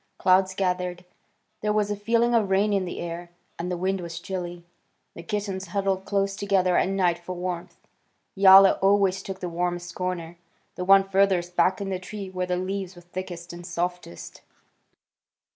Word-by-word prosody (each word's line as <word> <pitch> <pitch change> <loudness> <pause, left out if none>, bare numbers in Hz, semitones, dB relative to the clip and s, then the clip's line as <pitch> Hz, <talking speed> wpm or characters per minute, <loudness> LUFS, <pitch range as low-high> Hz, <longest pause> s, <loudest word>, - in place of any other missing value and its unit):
Clouds 190 0 +3
gathered. 180 -1 -2 0.6
There 210 - 0
was 210 -1 +1
a - - 0
feeling 230 +3 +1
of 220 -4 +2
rain 200 +2 +2
in 195 -2 +1
the 175 - -6
air, 170 0 -6 0.3
and 175 +2 -3
the 180 - -2
wind 190 +1 -1
was 170 -1 -6
chilly. 175 -1 -6 0.5
The - - -9
kittens 195 +1 -4
huddled 195 +1 -1
close 195 -1 0
together 195 -3 +1
at 185 - +2
night 180 -3 +1
for 180 +1 -7
warmth. 175 -1 -5 0.6
Yowler 195 0 +7
always 195 -1 +3
took 190 -1 -7
the 180 - -3
warmest 175 +1 -3
corner, 175 -2 -4 0.3
the 180 - -5
one 195 +1 +7
furthest 190 -3 +1
back 180 +2 +3
in 195 -1 -3
the 185 - -2
tree 195 +1 -7
where 185 -1 -3
the 180 0 0
leaves 190 0 -4
were 175 - -14
thickest 175 -1 -7
and 175 0 -9
softest. 175 - -5
185 Hz, 175 wpm, -25 LUFS, 175-195 Hz, 0.6 s, Yowler